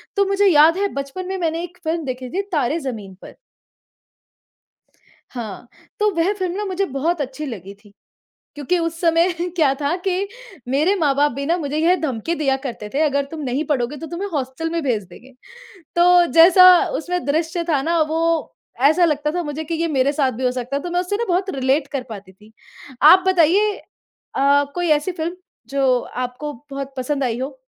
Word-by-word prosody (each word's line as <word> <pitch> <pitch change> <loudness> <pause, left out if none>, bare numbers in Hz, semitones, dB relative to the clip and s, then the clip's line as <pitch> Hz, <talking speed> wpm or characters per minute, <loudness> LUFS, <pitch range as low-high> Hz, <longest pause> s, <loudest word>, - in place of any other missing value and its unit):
तो 400 -1 +3
मुझे 395 +1 +2
याद 325 0 +6
है 405 +1 +1
बचपन 280 +7 -5
में 380 0 -3
मैंने 335 -1 -2
एक 355 0 -9
फ़िल्म 325 0 -2
देखी 255 -1 -5
थी 375 +10 -1
तारे 300 -1 0
ज़मीन 225 - -6
पर। - - -12 2.0
हाँ, 235 -2 -7 0.3
तो 425 0 +3
वह 335 +4 +2
फ़िल्म 370 -3 -3
ना 420 - -2
मुझे 390 0 -1
बहुत 320 +5 0
अच्छी 270 +3 -5
लगी 200 - -7
थी। 205 -2 -19 0.6
क्योंकि 295 +5 0
उस 330 0 -3
समय 335 +1 +3 0.2
क्या 300 -6 +3
था 290 +4 0
कि 380 +1 0 0.4
मेरे 300 +10 +2
माँ-बाप 290 -1 +2
भी 280 +3 -5
ना 335 +4 +1
मुझे 295 -3 -3
यह 335 +3 +3
धमकी 310 +3 -2
दिया 275 -4 +1
करते 225 -5 -6
थे 285 - +1
अगर 280 -2 +1
तुम 320 - -6
नहीं 270 +2 -2
पढ़ोगे 280 -1 -1
तो 320 - -7
तुम्हें 345 +5 -4
हॉस्टल 275 +3 -3
में 335 0 -2
भेज 235 -7 0
देंगे। 240 +9 -15 0.7
तो 350 0 +6
जैसा 355 +3 +8 0.3
उसमें 355 +2 -3
द्रश्य 325 +4 -1
था 295 -4 +2
ना 335 +2 +1
वो 320 +1 -1 0.7
ऐसा 345 +4 +3
लगता 300 -2 0
था 355 - 0
मुझे 300 0 -5
कि 330 - -4
ये 330 +1 -1
मेरे 275 -2 +1
साथ 275 -3 +1
भी 255 +3 -5
हो 250 - +3
सकता 250 +2 -4
है 280 - -3
तो 350 - -5
मैं 355 +1 +1
उससे 365 +3 -2
ना 470 - -1
बहुत 375 +2 0
रिलेट 270 +2 +1
कर 275 -3 -2
पाती 200 -4 -10
थी। 210 +3 -20 0.5
आप 365 +5 +8
बताइए 375 +4 +3 0.6
अ, 280 +1 +3
कोई 350 -1 -1
ऐसी 300 +5 +2
फ़िल्म 340 +1 -4 0.3
जो 270 -2 +2
आपको 250 +5 -5 0.2
बहुत 275 0 -6
पसंद 275 +2 -2
आई 240 -2 -1
हो? 270 - -5
305 Hz, 195 wpm, -20 LUFS, 270-345 Hz, 2.0 s, जैसा